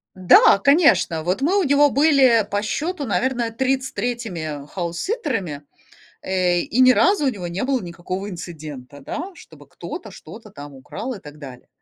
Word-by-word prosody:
Да, 185 +1 +6
конечно. 275 - +3
Вот 180 +9 -1
мы 360 +8 +2
у - - +1
него 285 0 +4
были, 270 -7 +4
по 205 0 -1
счету, 300 - -3
наверное, 240 0 -1
33-ми 230 - -3
хаус-ситтерами, 180 - -4 0.6
э, 180 -2 +1
и 245 - -1
ни 255 0 +7
разу 360 0 +2
у - - +4
него 190 -8 -4
не 175 +3 -4
было 260 -4 0
никакого 185 +3 -6
инцидента, 150 -6 -9
да, 360 - -6
чтобы - - -16
кто-то - - -8
что-то 220 -1 -12
там 145 -3 -11
украл 220 - -7
и 220 - -7
так 150 0 -13
далее. 130 -4 -11
205 Hz, 155 wpm, -21 LUFS, 170-265 Hz, 0.6 s, ни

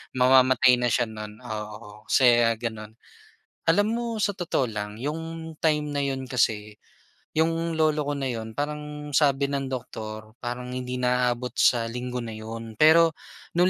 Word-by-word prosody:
mamamatay 130 0 +5
na 125 - +1
siya, 120 +1 +2
no'n, 105 0 -8
oo, 105 -1 -8
kasi, 120 -3 +5
ah, 115 - +2
gano'n. 110 -1 -6 0.7
Alam 205 +6 +4
mo, 235 0 -2
sa 210 -1 +1
totoo 175 -7 -1
lang, 105 -1 -5
'yong 160 +5 -5
time 150 -2 +1
na 145 - -1
'yon 135 -1 -1
kasi, 105 -5 -1 0.6
'yong 165 0 +1
lolo 155 -1 +2
ko 145 0 -2
na 135 -2 -2
'yon, 110 -1 -7
parang 150 0 -4
sabi 140 -1 +3
ng 140 -1 -2
doktor, 110 -4 -6
parang 125 +1 -5
hindi 125 0 -4
na 125 0 +2
aabot 120 0 -3
sa 120 -3 +3
linggo 125 +2 -4
na 115 -2 -5
'yon, 110 +1 -7
pero, 165 +1 +7 0.4
no'ng 180 +2 +4
125 Hz, 160 wpm, -26 LUFS, 115-150 Hz, 0.7 s, pero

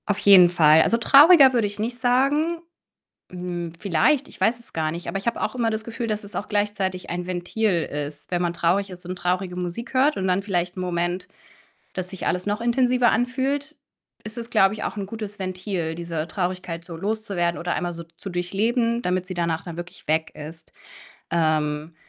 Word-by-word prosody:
Auf 205 -2 +1
jeden 190 -3 +8
Fall. 160 -2 +6
Also, 230 - +3
trauriger 275 +3 +8
würde 230 -4 +2
ich 205 +1 -8
nicht 240 +3 -3
sagen. 280 +7 +2 0.7
Hm, 175 -2 -5
vielleicht, 205 - +2
ich - - -14
weiß 235 +1 +2
es 235 - -15
gar 155 -1 -1
nicht. 170 +2 -7
Aber - - -2
ich 195 - -6
habe 235 - -1
auch - - -2
immer 235 -2 +1
das 220 0 -3
Gefühl, 230 +1 -5
dass 215 -1 -2
es 200 -2 -11
auch 205 - -3
gleichzeitig 205 -3 -2
ein 175 +1 -4
Ventil 180 0 0
ist. 145 +1 -6
Wenn 175 -1 0
man 175 -1 0
traurig 185 +4 +1
ist 180 -1 -11
und 180 +1 -5
traurige 180 +1 -1
Musik 180 +8 -5
hört 275 +3 +3
und 190 - -1
dann 185 +1 +2
vielleicht 180 -2 -2
'n - - -3
Moment, 175 0 -2 0.7
dass 185 -1 -4
sich 190 - -5
alles 180 0 -1
noch 205 +2 -1
intensiver 245 0 +3
anfühlt, 270 +5 -1 0.5
ist 215 +2 -9
es, 235 0 -6
glaube 205 -4 +4
ich, 215 - -6
auch - - -4
'n 200 - -3
gutes 210 0 -7
Ventil, 185 -3 -3
diese 165 -2 -4
Traurigkeit 180 -2 -3
so 175 -2 -8
loszuwerden 195 -2 -2
oder 175 +1 -2
einmal 175 0 -2
so 170 0 -8
zu 165 +4 -10
durchleben, 225 +7 0
damit 180 -3 -1
sie 185 - -5
danach 170 -2 -1
dann 170 -2 -8
wirklich 175 +1 -9
weg 160 +1 0
ist. 160 +2 -10 0.6
Ähm, 155 -1 0
185 Hz, 200 wpm, -24 LUFS, 175-225 Hz, 0.7 s, jeden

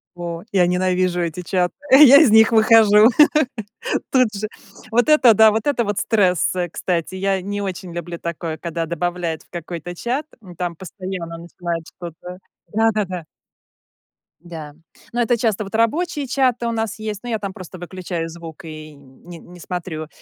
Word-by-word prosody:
О, 170 -1 -6
я 180 -3 +4
ненавижу 180 0 +1
эти 170 +1 -3
чаты, 180 0 -1 0.2
я 280 0 +9
из 295 -8 +6
них 220 +2 +6
выхожу 220 -1 +6 1.0
тут 250 -5 +3
же. 210 +1 -4 0.4
Вот 240 +5 +2
это 285 -7 +6
да, 220 +1 +6
вот 220 +3 -2
это 275 -5 +1
вот 205 -1 -2
стресс, 185 -6 +2
э, 175 -1 -2
кстати. 170 +1 -3
Я 195 0 0
не 205 +2 -4
очень 185 -2 -5
люблю 170 0 -6
такое, 165 -1 -5
когда 165 0 -3
добавляют 170 0 -3
в - - -32
какой-то 175 0 -6
чат. 255 - -3 0.2
М, 180 -3 -12
там 170 -1 -4
постоянно 185 -2 -7
начинают 170 -1 -5
что-то 180 +1 -10 0.3
да-да-да. 210 -6 0 1.2
Да. 160 -4 -9 0.4
Но 240 - -1
это 240 +1 +2
часто 220 -2 0
вот 195 +2 -11
рабочие 290 +6 0
чаты 250 -2 +1
у 235 - -1
нас 225 -2 -3
есть, 215 -2 -5
но 245 - -7
я 225 -2 -1
там 200 -2 -5
просто 185 0 -10
выключаю 175 -2 -5
звук 165 +1 -10
и 155 -1 -9
не 140 +5 -14
не 175 +1 -15
смотрю. 165 -4 -5
185 Hz, 165 wpm, -20 LUFS, 170-220 Hz, 1.2 s, я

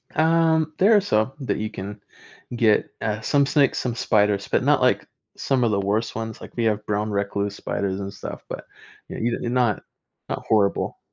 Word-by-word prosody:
Um, 160 0 +3
there 210 +4 +6
are 205 - +5
some 110 - +1
that 130 - -1
you 110 0 -2
can 100 0 -7 0.5
get, 115 -3 +3
uh, 110 -1 -2
some 140 +4 +3
snakes, 140 -1 +3
some 120 -2 -2
spiders, 105 -3 +1
but - - +1
not, - - +3
like, - - +2 0.3
some 130 -3 +1
of 115 - +2
the 100 -1 +1
worst 105 +3 -1
ones, 110 0 -5
like, - - -11
we 120 - 0
have 105 -1 +1
brown 105 +1 -1
recluse 100 0 -2
spiders 100 -1 -2
and 100 0 -5
stuff, 95 - -8
but - - -7 0.4
you - - -7
you're 115 +1 -1
not 120 -4 +1 0.5
not, - - -2
uh, - - -13
horrible. 105 -3 +1
110 Hz, 195 wpm, -23 LUFS, 105-130 Hz, 0.5 s, there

